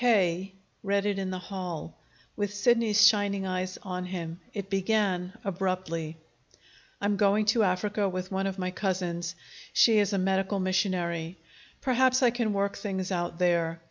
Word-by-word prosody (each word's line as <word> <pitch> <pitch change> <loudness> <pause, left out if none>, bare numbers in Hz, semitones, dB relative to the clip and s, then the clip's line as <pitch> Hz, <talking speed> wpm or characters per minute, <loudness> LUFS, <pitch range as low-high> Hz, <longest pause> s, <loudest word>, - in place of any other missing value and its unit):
K. 190 -6 +2 0.3
read 200 0 0
it 200 -1 0
in 190 -1 -2
the 185 - -3
hall, 180 -4 -6 0.4
with 205 -1 -1
Sidney's 220 0 +4
shining 205 -3 +3
eyes 185 0 -2
on 180 -2 -4
him. 170 -2 -5
It 200 -2 -5
began 195 -2 0
abruptly: 180 -4 -2 0.8
"I'm 205 0 0
going 205 +1 +3
to 230 - +2
Africa 205 +1 +1
with 185 0 -5
one 195 0 0
of 195 0 -4
my 185 -1 -2
cousins. 180 -3 -2 0.4
She 225 -2 +6
is 205 -1 +2
a 200 - +1
medical 195 +1 +1
missionary. 185 -3 -1 0.4
Perhaps 260 0 +3
I 245 - +5
can 235 -2 0
work 200 0 -1
things 195 -2 -3
out 175 -2 -2
there. 170 -2 +1
190 Hz, 155 wpm, -28 LUFS, 180-205 Hz, 0.8 s, She